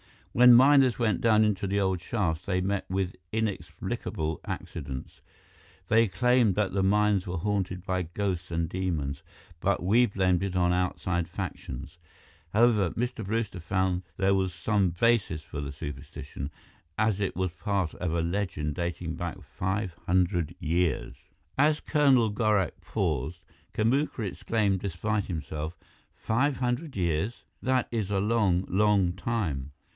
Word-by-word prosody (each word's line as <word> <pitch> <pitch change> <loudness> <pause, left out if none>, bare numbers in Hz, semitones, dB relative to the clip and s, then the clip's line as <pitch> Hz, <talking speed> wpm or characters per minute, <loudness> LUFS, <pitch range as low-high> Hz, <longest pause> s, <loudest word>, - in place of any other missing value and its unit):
"When 125 +1 +8
miners 130 0 +6
went 110 -5 +1
down 110 -1 +5
into 100 -2 0
the 100 +1 +1
old 95 -2 0
shafts, 90 -5 -1
they 90 -2 0
met 100 +1 -2
with 95 0 -2 0.2
inexplicable 95 -7 -3
accidents. 70 -5 -6 0.7
They 115 +1 +5
claimed 125 -1 +3
that 105 -2 +1
the 95 - 0
mines 100 0 +2
were 90 0 -2
haunted 95 -1 -2
by 95 -1 0
ghosts 90 +1 -3
and 85 -1 -1
demons, 80 -7 -2 0.4
but 95 +1 0
we 115 +7 +5
blamed 95 -3 +1
it 95 -2 -2
on 90 -1 +3
outside 90 -1 0
factions. 85 -4 -6 0.5
However, 105 -4 +4
Mr. 120 -2 -3
Brewster 110 -3 -2
found 95 +1 0
there 95 +1 +3
was 95 -2 +1
some 95 +3 +1
basis 95 -4 +1
for 75 - -6
the 70 0 -5
superstition, 70 0 -7 0.5
as 110 -2 +2
it 100 -4 -1
was 95 0 -1
part 95 -2 -1
of 90 -3 -2
a 85 - +1
legend 85 -4 -2
dating 85 -1 -3
back 90 -1 -4
five 95 0 -2
hundred 90 -2 +1
years." 85 0 0 0.5
As 150 +1 +4
Colonel 135 -7 +3
Gorak 105 -4 +1
paused, 85 - -2 0.3
Kamuka 125 +3 +1
exclaimed 100 0 0
despite 100 +3 -1
himself, 80 -1 -5 0.4
"Five 130 +5 0
hundred 130 +4 -2
years! 90 +4 -1 0.2
That 130 -1 +1
is 110 -4 -1
a 100 -1 +1
long, 105 -4 +2
long 100 -2 +3
time!" 85 - -2
95 Hz, 140 wpm, -28 LUFS, 85-110 Hz, 0.7 s, When